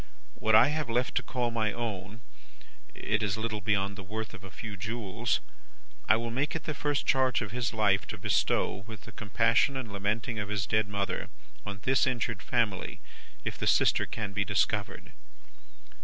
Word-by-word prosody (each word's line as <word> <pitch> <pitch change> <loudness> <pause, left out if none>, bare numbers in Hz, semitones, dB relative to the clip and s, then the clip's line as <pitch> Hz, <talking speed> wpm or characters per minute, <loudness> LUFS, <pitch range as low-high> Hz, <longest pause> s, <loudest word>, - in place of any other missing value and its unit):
What 110 0 +3
I 110 - +8
have 150 -3 -1
left 125 +2 +1
to - - +3
call 125 -2 -1
my 110 -2 +1
own 105 -2 -4 0.7
it 105 +1 0
is 105 -1 0
little 110 -1 -2
beyond 100 -1 +1
the 100 - -7
worth 110 +3 -5
of 100 - -10
a 95 - -8
few 105 +2 -7
jewels 110 +3 -1 0.7
I - - +8
will 115 +1 -2
make 140 +7 -1
it 160 - -3
the 155 - -2
first 145 0 0
charge 130 -2 +3
of 105 - -6
his 120 -1 -1
life 100 -3 +2
to - - -5
bestow, - - +1
with 110 -3 -8
the 115 - -11
compassion 115 +5 +2
and 115 -6 -5
lamenting 110 +3 -1
of 105 -1 -3
his 100 -3 0
dead 110 +1 +2
mother, 100 -1 -2 0.4
on 100 -1 -5
this 130 -1 +3
injured 115 -4 -1
family, 115 -6 0 0.5
if - - -3
the - - -1
sister - - +4
can 105 -3 -4
be 100 +1 +1
discovered. 105 +1 0
110 Hz, 185 wpm, -30 LUFS, 100-120 Hz, 0.7 s, I